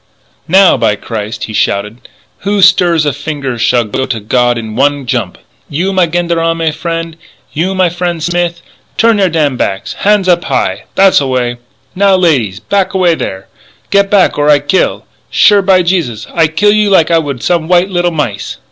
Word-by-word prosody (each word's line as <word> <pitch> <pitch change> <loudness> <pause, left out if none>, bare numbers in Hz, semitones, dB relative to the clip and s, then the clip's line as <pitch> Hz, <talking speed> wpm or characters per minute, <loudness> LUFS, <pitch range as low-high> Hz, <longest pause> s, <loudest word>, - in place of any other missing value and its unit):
"Now, 190 +2 +4
by 105 - +1
Christ!" 110 +1 -6
he 110 - -6
shouted, 105 +3 -2 0.3
"who 200 0 0
stirs 170 -5 +3
a 145 - 0
finger 140 -3 -5
shall 120 +1 +2
go 130 +5 -3
to 115 -3 -3
God 120 +3 0
in 110 -2 -6
one 140 +1 0
jump! 120 -7 -3 0.3
You, 180 +7 -2
my 185 -2 +2
gendarme 165 -1 -1
frien' 165 0 -5 0.4
you, 185 +5 -1
my 185 -1 +2
frien' 175 0 -3
Smith 170 +1 -2 0.3
turn 225 -2 +3
your 190 -2 +2
damn 150 -5 0
backs 95 -4 -3
han's 205 -2 +2
up 175 +1 +2
high! - - -2
tha's 195 0 +4
the 140 - -2
way! 125 -2 -1 0.4
now, 195 0 +3
ladies! 135 - +1
back 195 - -1
away 180 -3 +3
there 95 -11 -5 0.4
get 200 0 +3
back 195 -6 +2
or 145 +1 +2
I 150 - +6
kill! 145 +6 -1 0.2
sure, 205 -2 +4
by 190 -2 +3
Jesus, 160 - -2
I 165 -2 +3
kill 185 +7 +2
you 210 0 +2
like 175 -4 +3
I 165 - +4
would 140 -6 -5
some 170 -3 0
white 180 +2 +2
little 175 -1 +1
mice! 145 -11 -4
165 Hz, 185 wpm, -11 LUFS, 130-185 Hz, 0.4 s, I